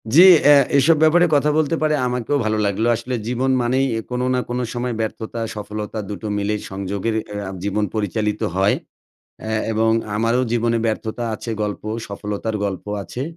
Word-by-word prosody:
জি, 170 - +9 0.2
অ্যা 145 - +8 0.2
এসব 150 +4 +5
ব্যাপারে 170 +3 +5
কথা 145 +1 +3
বলতে 155 +1 +2
পেরে 155 -1 +2
আমাকেও 125 +3 -1
ভালো 110 0 +1
লাগলো। 100 +3 0
আসলে 125 +2 -4
জীবন 125 +2 0
মানেই 130 +3 +1
অ্যা 115 - -1
কোনো 125 0 -1
না 125 - +1
কোনো 125 +1 -1
সময় 120 0 -2
ব্যর্থতা, 110 +1 -4 0.2
সফলতা, 105 +1 -5
২ - - -3
টো 110 - -4
মিলে 105 +1 0 0.2
সংযোগের 100 +3 -2 0.2
অ্যা 105 -1 -4 0.2
জীবন 105 +1 0
পরিচালিত 105 0 -1
হয়। 95 +2 +3 0.7
অ্যা 110 0 -2 0.2
এবং 110 +1 +2 0.3
আমারও 115 +3 +2
জীবনে 115 0 +1
ব্যর্থতা 110 +1 -2
আছে 115 - -6
গল্প। 105 -1 -3 0.3
সফলতার 105 +2 -4
গল্প 95 -3 -3 0.2
আছে। 125 +6 -6
110 Hz, 170 wpm, -21 LUFS, 105-125 Hz, 0.7 s, জি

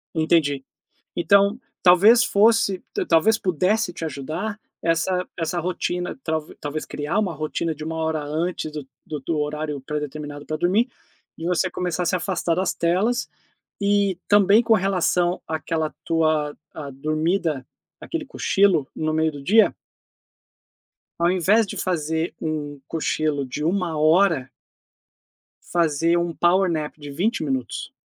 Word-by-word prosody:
Entendi. 155 -4 +2 0.5
Então 200 +5 +4 0.2
talvez 200 +7 +7
fosse 205 -2 +3
t - - -2
talvez 175 +7 +4
pudesse 185 +3 +1
te 165 - -6
ajudar 160 +9 -4 0.2
essa 175 +2 +1
essa 170 +1 -1
rotina 180 +3 -2
tal 160 -1 -1 0.2
talvez 150 +1 -4
criar 150 +7 -3
uma 190 -5 -1
rotina 155 +2 -2
de 155 +1 -8
1 160 0 -4
hora 160 -1 -1
antes 155 +1 -2
do 150 0 -8
do 155 +3 -2
horário 150 -1 -3
pré-determinado 145 0 -5
pra 155 - -3
dormir 190 - +2 0.5
e 165 - -5
você 180 +1 +1
começar 180 -1 -2
a 175 - -1
se 185 - +2
afastar 180 -2 -1
das 185 - +1
telas, 190 +8 +1 0.5
e 200 -2 +2
também 205 +2 +6
com 225 -1 +3
relação 180 -2 +1
àquela 160 0 -2
tua 155 -2 +1 0.2
à 145 -3 -6
dormida, 155 +1 -1 0.4
aquele 330 -2 -4
cochilo 195 - +2
no 155 0 -1
meio 160 0 +2
do 145 - -9
dia 220 +7 +5 1.5
ao 170 +1 +3
invés 190 +5 +3
de 200 - -7
fazer 160 -2 -1
um 145 -3 -3
cochilo 155 -3 -1
de 145 +4 -5
1 175 -2 0
hora 155 -3 +3 1.2
fazer 165 0 +2
um 170 -1 -1
power 185 +2 +3
nap 155 -2 -2
de 145 -1 -8
20 190 +8 -1
minutos 130 -4 -3
165 Hz, 140 wpm, -23 LUFS, 155-185 Hz, 1.5 s, talvez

